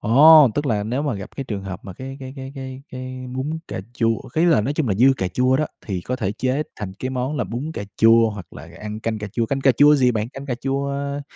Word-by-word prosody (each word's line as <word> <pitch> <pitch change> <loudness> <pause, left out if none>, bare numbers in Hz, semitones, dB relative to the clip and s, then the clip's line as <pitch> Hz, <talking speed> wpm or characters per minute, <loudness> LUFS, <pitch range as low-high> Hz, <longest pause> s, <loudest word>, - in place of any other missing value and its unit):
Ồ! 145 +5 +8
Tức 145 0 -1
là 105 -5 +1
nếu 120 +7 -2
mà 145 -6 -1
gặp 100 -1 -7
cái 135 - -3
trường 100 -6 -5
hợp 95 -2 -6
mà 95 - -7
cái 135 +6 -8
cái 130 0 -7
cái 135 0 -7
cái 130 0 -7
cái 130 0 -7
bún 150 +5 -2
cà - - -4
chua 115 -1 +2 0.2
ý 160 - +3
là 165 -9 +5
nói 125 +7 -1
chung 150 -5 0
là 100 - +1
dư 120 +7 +4
cà 95 -5 -1
chua 130 +7 +2
đó, 155 - 0 0.2
thì 95 -5 -2
có 125 +8 -3
thể 105 -6 -2
chế 130 +6 -1
thành 100 -3 -5
cái 130 - -3
món 130 +3 -2
là 130 - 0
bún 120 - -4
cà - - -4
chua 115 0 +5
hoặc 100 -5 -9
là - - -10
ăn 105 0 -6
canh 110 -1 -2
cà 105 - -5
chua. 115 -1 0
Canh 135 +3 -1
cà 135 -1 +5
chua 145 +3 +6
gì 130 -3 +4
bạn? 110 +1 -2
Canh 135 +2 -9
cà 125 - -1
chua, 135 +2 -2
a, 140 +1 -3
130 Hz, 280 wpm, -22 LUFS, 110-140 Hz, 0.2 s, Ồ